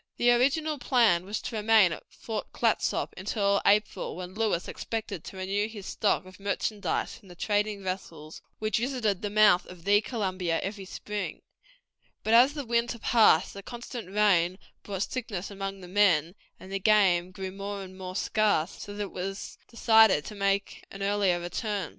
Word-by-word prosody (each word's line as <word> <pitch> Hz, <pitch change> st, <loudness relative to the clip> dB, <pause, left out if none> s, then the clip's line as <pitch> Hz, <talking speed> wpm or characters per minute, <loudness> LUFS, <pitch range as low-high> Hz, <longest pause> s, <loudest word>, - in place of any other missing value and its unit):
The 245 Hz, 0 st, +4 dB
original 285 Hz, +5 st, +2 dB
plan 230 Hz, -8 st, +3 dB
was 205 Hz, +2 st, -3 dB
to 235 Hz, -, -5 dB
remain 215 Hz, -4 st, +5 dB
at -, -, -5 dB
Fort 220 Hz, -2 st, -6 dB
Clatsop -, -, 0 dB
until 200 Hz, -2 st, 0 dB
April, 210 Hz, +1 st, +1 dB
when 180 Hz, +1 st, -7 dB
Lewis 210 Hz, -4 st, -1 dB
expected 215 Hz, -6 st, -5 dB
to 190 Hz, -, -9 dB
renew 195 Hz, +3 st, -1 dB
his 215 Hz, -3 st, -9 dB
stock 205 Hz, -2 st, 0 dB
of 185 Hz, +1 st, -14 dB
merchandise 200 Hz, +1 st, -2 dB
from 205 Hz, -, -17 dB
the 175 Hz, -, -12 dB
trading 205 Hz, +1 st, -1 dB
vessels, 165 Hz, -5 st, -6 dB, 0.2 s
which 215 Hz, +1 st, 0 dB
visited 235 Hz, -6 st, -1 dB
the 205 Hz, -, -2 dB
mouth 210 Hz, -3 st, +5 dB
of 180 Hz, -2 st, -12 dB
the 205 Hz, +2 st, +4 dB
Columbia 185 Hz, -8 st, -2 dB
every 195 Hz, 0 st, -5 dB
spring; 210 Hz, +2 st, -5 dB, 0.8 s
but 220 Hz, -, +1 dB
as 255 Hz, +5 st, +6 dB
the 290 Hz, -3 st, -4 dB
winter 235 Hz, +1 st, 0 dB
passed 220 Hz, -7 st, +4 dB
the 200 Hz, -, -8 dB
constant 240 Hz, -2 st, -8 dB
rain 190 Hz, -3 st, +3 dB, 0.2 s
brought 195 Hz, -1 st, -3 dB
sickness 210 Hz, -7 st, -5 dB
among 195 Hz, 0 st, -5 dB
the 180 Hz, -, -10 dB
men, 180 Hz, -4 st, +3 dB, 0.3 s
and 195 Hz, 0 st, -6 dB
game 190 Hz, -5 st, +4 dB
grew 190 Hz, 0 st, -6 dB
more 200 Hz, +1 st, -5 dB
and 185 Hz, 0 st, -11 dB
more 185 Hz, -1 st, -7 dB
scarce, 200 Hz, -5 st, 0 dB
so 205 Hz, -, -8 dB
that 205 Hz, -, -3 dB
it 200 Hz, -, -7 dB
was 195 Hz, +2 st, -6 dB
decided 220 Hz, -8 st, +4 dB
to -, -, -7 dB
make 195 Hz, -1 st, -1 dB
an 195 Hz, 0 st, -7 dB
earlier 200 Hz, -3 st, +2 dB
return. 190 Hz, +1 st, -3 dB
200 Hz, 170 wpm, -28 LUFS, 185-220 Hz, 0.8 s, as